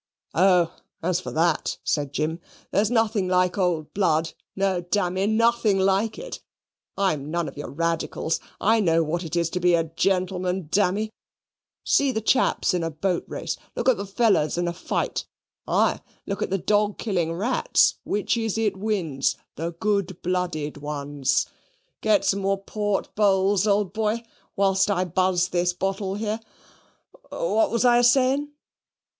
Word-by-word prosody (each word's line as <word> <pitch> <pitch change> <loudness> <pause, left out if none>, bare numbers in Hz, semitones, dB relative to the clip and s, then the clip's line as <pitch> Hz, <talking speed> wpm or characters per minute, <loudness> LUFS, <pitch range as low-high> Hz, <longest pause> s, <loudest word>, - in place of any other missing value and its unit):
"Oh, 180 -1 +4 0.3
as 180 0 +1
for 180 - -6
that," 165 0 +1
said 145 -3 -1
Jim, 155 +4 -2 0.3
"there's 205 +1 +2
nothing 225 -5 +1
like 180 0 +2
old 175 -6 -1
blood; 165 -5 +1 0.2
no, 195 -2 0
dammy, 185 +1 0
nothing 230 -1 +3
like 195 +3 +1
it. - - -7 0.6
I'm 155 -8 0
none 170 0 -1
of 135 - -8
your 145 - -6
radicals. 165 +1 -1 0.2
I 225 +3 +3
know 165 -5 +3
what 170 +3 -2
it 165 -1 -5
is 170 -1 0
to 180 - -2
be 175 -1 +4
a 165 - +2
gentleman, 180 +1 -1
dammy. 205 +3 +1 0.7
See 280 -1 +3
the 220 - -1
chaps 220 -2 +2
in 180 - 0
a 165 - -1
boat 170 +3 -2
race; - - -4 0.2
look 245 - -2
at 260 - +5
the 200 - -5
fellers 195 -7 +2
in 175 0 0
a 170 - -1
fight; 175 - -3 0.4
aye, - - +2 0.2
look 200 - -4
at - - -2
a 195 - +2
dawg 205 +2 +1
killing 180 -7 -1
rats 225 +9 +2
which 205 +3 0
is 225 -2 -1
it 215 -3 +1
wins? 185 -10 -1 0.2
the 165 +3 -3
good 200 -1 -1
blooded 175 -5 -2
ones. 145 -2 -1 0.6
Get 215 -2 +3
some 200 - +2
more 195 0 +1
port, 205 -1 -2
Bowls, 200 -1 +3
old 205 -2 +1
boy, 220 +1 -1 0.3
whilst 195 0 +2
I 185 -2 +1
buzz 180 0 +1
this 175 0 +1
bottle 195 +1 -2
here. 215 +1 -2 0.9
What - - +1
was 235 +1 +1
I 240 -1 +6
asaying?" 260 +4 +3
190 Hz, 160 wpm, -24 LUFS, 170-210 Hz, 0.9 s, I